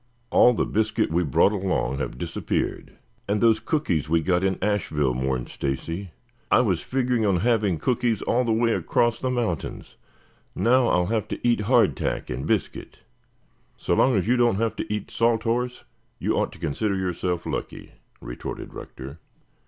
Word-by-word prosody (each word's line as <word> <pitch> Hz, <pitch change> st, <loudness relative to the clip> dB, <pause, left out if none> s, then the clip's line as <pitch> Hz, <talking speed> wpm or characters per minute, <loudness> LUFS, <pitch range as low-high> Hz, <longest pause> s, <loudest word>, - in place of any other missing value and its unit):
All 125 Hz, -, +6 dB
the -, -, +1 dB
biscuit 110 Hz, -5 st, 0 dB
we 85 Hz, +2 st, +2 dB
brought 75 Hz, +6 st, +3 dB
along 95 Hz, -, -1 dB
have 60 Hz, -, -4 dB
disappeared." -, -, -3 dB, 0.4 s
"And 105 Hz, +1 st, +1 dB
those 110 Hz, -1 st, +4 dB
cookies 110 Hz, -, -1 dB
we 85 Hz, 0 st, +3 dB
got 90 Hz, +2 st, +1 dB
in 95 Hz, -1 st, +1 dB
Asheville," 80 Hz, -10 st, 0 dB
mourned 65 Hz, -1 st, -2 dB
Stacy. 80 Hz, +8 st, -4 dB, 0.4 s
"I -, -, +5 dB
was -, -, 0 dB
figuring 125 Hz, -3 st, 0 dB
on 95 Hz, -5 st, +2 dB
having 105 Hz, -6 st, +2 dB
cookies 115 Hz, +4 st, 0 dB
all 125 Hz, +2 st, +1 dB
the 115 Hz, -, 0 dB
way 115 Hz, +1 st, +2 dB
across 120 Hz, -1 st, +1 dB
the 130 Hz, -, -1 dB
mountains. 115 Hz, -, -3 dB, 0.6 s
Now 125 Hz, +1 st, +3 dB
I'll 90 Hz, -4 st, +2 dB
have 110 Hz, +2 st, -1 dB
to -, -, -3 dB
eat 120 Hz, -3 st, +2 dB
hard 125 Hz, -2 st, +4 dB
tack -, -, -3 dB
and 60 Hz, +2 st, -4 dB
biscuit." -, -, -2 dB, 0.8 s
"So -, -, -1 dB
long 130 Hz, -2 st, +4 dB
as 95 Hz, -, 0 dB
you 125 Hz, +2 st, +3 dB
don't 120 Hz, -4 st, +3 dB
have 115 Hz, +2 st, -1 dB
to -, -, -4 dB
eat 105 Hz, -1 st, -3 dB
salt 115 Hz, -1 st, +1 dB
horse, 125 Hz, +2 st, -1 dB, 0.3 s
you -, -, -1 dB
ought -, -, 0 dB
to -, -, -13 dB
consider 100 Hz, +7 st, -1 dB
yourself 90 Hz, -2 st, -2 dB
lucky," -, -, -5 dB, 0.3 s
retorted -, -, -7 dB
Rector. 70 Hz, +5 st, -9 dB
105 Hz, 170 wpm, -24 LUFS, 85-120 Hz, 0.8 s, All